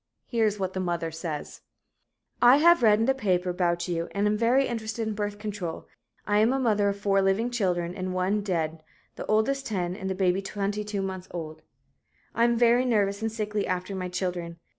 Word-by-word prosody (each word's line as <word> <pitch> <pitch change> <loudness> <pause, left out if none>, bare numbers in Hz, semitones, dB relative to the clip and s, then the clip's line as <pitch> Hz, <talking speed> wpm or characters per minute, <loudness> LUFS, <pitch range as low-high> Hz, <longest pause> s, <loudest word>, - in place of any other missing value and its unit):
Here 225 -2 +1
is 210 0 -1
what 190 -1 -2
the 190 - -3
mother 170 -2 -2
says: 160 -2 -6 0.8
"I 245 +3 +8
have 340 +1 +5
read 215 -3 +5
in 225 - +2
the 270 - +3
paper 185 -8 0
about 175 -1 0
you 170 -1 -2
and 200 +1 +1
am 210 0 +2
very 240 +5 +3
interested 225 -1 -3
in 220 - -2
Birth 205 0 -3
Control 205 -5 -5 0.4
I 205 0 +2
am 220 +3 +4
a 270 - +1
mother 210 -5 +2
of 200 - -3
four 200 -1 +2
living 195 +5 +1
children 180 -7 -1
and 185 -1 -4
one 185 +3 0
dead 165 -5 -2 0.3
the - - -7
oldest 265 +6 +1
10 180 -4 -2
and 190 -1 -4
baby 185 0 +2
22 205 0 -3
months 190 -1 -5
old. 155 -3 -7 0.7
I 230 - +3
am 235 0 +2
very 240 +1 +4
nervous 205 -4 +1
and 225 0 -1
sickly 210 -2 -2
after 185 +1 -2
my 185 -1 -4
children. 180 -2 -3
200 Hz, 200 wpm, -27 LUFS, 180-220 Hz, 0.8 s, I